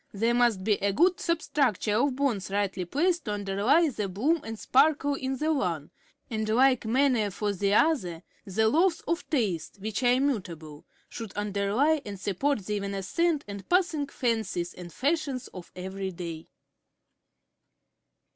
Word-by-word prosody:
There 230 +4 +2
must 240 -6 +2
be 210 0 +2
a 200 - +3
good 355 - +3
substructure 275 - 0
of 255 +3 +2
bones 250 -9 -1
rightly 195 -2 -1
placed 335 - 0
to 210 - -2
underlie 205 - +2
the 210 -6 -3
bloom 280 - +1
and 225 0 -6
sparkle 285 +4 +3
in 265 -1 -3
the 310 +4 +1
one; 170 - -2 0.4
and 220 -1 -3
in 220 - +2
like 255 -1 +4
manner 245 -3 +2
for 205 +1 -2
the 200 +1 +1
other 185 - +1 0.2
the 220 +3 +1
laws 330 +8 +2
of 335 +1 -3
taste, 205 - -1
which 210 +3 -4
are 245 -1 +4
immutable, 180 - -2 0.2
should 225 -4 -8
underlie 210 +9 +1
and 200 -2 -7
support 210 +4 -1
the 210 +1 -1
evanescent 200 - -1
and 200 -1 -8
passing 345 -5 +2
fancies 220 -10 -2
and 175 -1 -10
fashions 280 - -1
of 180 -2 -11
every 190 +1 -4
day. 170 -3 -7
220 Hz, 155 wpm, -28 LUFS, 195-280 Hz, 0.4 s, like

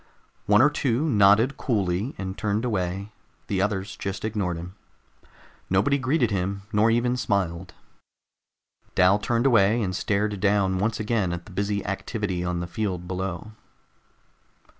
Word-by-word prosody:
One 105 +3 +6
or 145 - +5
two 140 +1 0
nodded 110 +2 +4
coolly 100 0 -1
and 95 -1 -5
turned 110 +2 -1
away; 100 -2 -2 0.3
the 95 -2 -1
others 100 -1 -2
just 100 +2 -4
ignored 100 -6 -2
him. 85 +2 -8 1.0
Nobody 105 +10 +2
greeted 130 -3 +1
him, 100 +1 -2
nor 105 +2 +4
even 120 +2 +2
smiled. 90 -6 -2 1.2
Dal 95 +3 +5
turned 120 +2 0
away 115 -3 +4
and 95 -5 -2
stared 105 0 -1
down 100 -2 +2
once 105 +2 -1
again 110 -4 0
at 85 0 -5
the 105 - -13
busy 100 +2 -2
activity 100 -2 -3
on 90 -1 -2
the - - -3
field 90 -1 -3
below. 95 +2 -4
100 Hz, 140 wpm, -25 LUFS, 95-110 Hz, 1.2 s, One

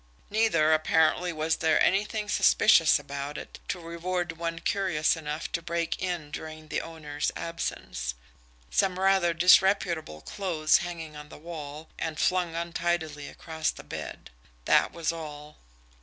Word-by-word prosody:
Neither, 210 -8 +3
apparently, 160 +3 +3
was 160 0 0
there 160 - +3
anything 210 +2 +1
suspicious 175 -4 +5
about 140 +1 -6
it - - -9
to 180 - -3
reward 175 +1 -3
one 165 0 -4
curious 170 -4 +1
enough 155 -1 -5
to 170 - -2
break 170 0 -2
in 175 -5 -3
during 155 0 -8
the 155 - -1
owner's 150 -3 -4
absence - - -4 0.6
some 190 -2 +2
rather 190 -2 +3
disreputable 170 - +3
clothes 165 - +1
hanging 165 -3 -6
on 150 0 -10
the - - -11
wall, 155 -1 -8
and 160 -1 -3
flung 180 -2 +1
untidily 165 -3 -2
across 160 -1 -3
the - - -6
bed - - -8 0.3
that - - +4
was 165 -1 -1
all. 150 -2 -9
165 Hz, 140 wpm, -28 LUFS, 155-175 Hz, 0.6 s, suspicious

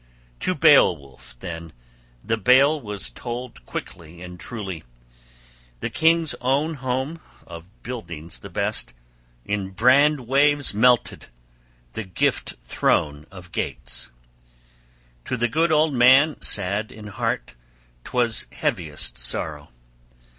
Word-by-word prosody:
To - - -1
Beowulf 60 -3 +3
then 85 -2 -7 0.5
the 115 - 0
bale 135 +8 +4
was 100 - -3
told 120 - -7
quickly 85 0 -8
and 90 0 -10
truly: 95 -4 -5 1.0
the - - -4
king's 165 -1 +3
own 140 +5 +1
home, 130 +3 -3 0.3
of 85 0 -11
buildings 85 -10 -7
the - - -10
best, 60 - -1 0.5
in 100 -2 -2
brand 130 +8 +4
waves 145 +1 +3
melted, 120 +2 +2 0.7
that 95 -5 -7
gift - - 0
throne 75 +4 0
of 90 -2 -13
Geats. - - -1 1.2
To 125 - -2
the 120 +1 +1
good 160 +7 +1
old 155 -1 +3
man 130 +5 +5
sad 100 +2 0
in 110 -1 -11
heart, 100 -10 -3 0.5
'twas 120 -2 0
heaviest - - -2
sorrow. 75 +4 -1
110 Hz, 110 wpm, -23 LUFS, 85-135 Hz, 1.2 s, man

